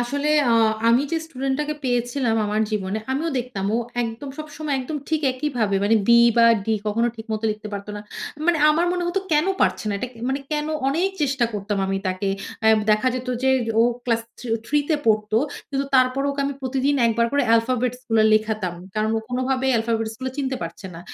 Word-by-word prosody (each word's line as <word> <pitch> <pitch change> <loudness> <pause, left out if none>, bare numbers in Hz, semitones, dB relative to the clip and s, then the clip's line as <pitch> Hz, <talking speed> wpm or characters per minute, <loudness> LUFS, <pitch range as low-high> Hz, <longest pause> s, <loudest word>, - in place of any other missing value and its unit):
আসলে 280 +5 -1 0.2
আ - - +4 0.4
আমি 235 +3 +4
যে - - +2
স্টুডেন্ট 270 -3 -2
টাকে 300 0 -2
পেয়েছিলাম, 245 -1 0
আমার 210 +1 0
জীবনে 205 0 -2
আমিও 310 +5 -1
দেখতাম। 240 -6 -4
ও - - +1 0.2
একদম, 235 +4 -5
সবসময় 305 -1 -4
একদম 280 +4 -4
ঠিক 315 -1 +1
একইভাবে 250 -7 -1
মানে 220 - +3
B - - -10 0.3
বা 235 - +6 0.2
D - - -24 0.2
কখনো 230 +3 +1
ঠিক 220 0 -9
মত 215 0 -3
লিখতে 215 0 -6
পারত 200 0 -5
না। - - -6 0.5
মানে 345 -2 +3
আমার 330 +3 +2
মনে 355 - -1
হতো 380 +2 0
"কেন 300 +3 +3
পারছে - - +1
না? 205 - 0
এটা 250 - -4
কে 230 - -17
মানে 275 +1 -1
কেন?" 300 0 -1 0.2
অনেক 335 +7 +1
চেষ্টা 270 -3 +1
করতাম 205 0 -3
আমি 195 0 -1
তাকে 185 +2 -1 0.4
আ - - +4 0.2
দেখা 215 +4 +3
যেত 255 0 -5
যে 265 - +3 0.3
ও - - +7 0.2
ক্লাস 230 -2 +1 0.2
থিউ 230 -3 -1
3 295 0 +2
তে 310 - +4
পড়ত। 215 -1 +2 0.4
কিন্তু 275 0 -1
তারপরে 260 +2 +3
ওকে 280 0 -3
আমি 280 - -3
প্রতিদিন 270 +2 0
১ 230 - +2
বার 235 - +4
করে 285 0 +2
আলফাবেটস 250 +1 +1
গুলা 225 -1 +4
লেখাতাম। 215 -4 0 0.2
কারণ 215 0 0
ও - - +2
কোনভাবেই 260 +1 0
আলফাবেটস 225 -1 -1
গুলো 260 0 -3
চিনতে 265 -2 -1
পারছে 170 +4 -7
না। - - -8
250 Hz, 205 wpm, -23 LUFS, 220-280 Hz, 0.5 s, ও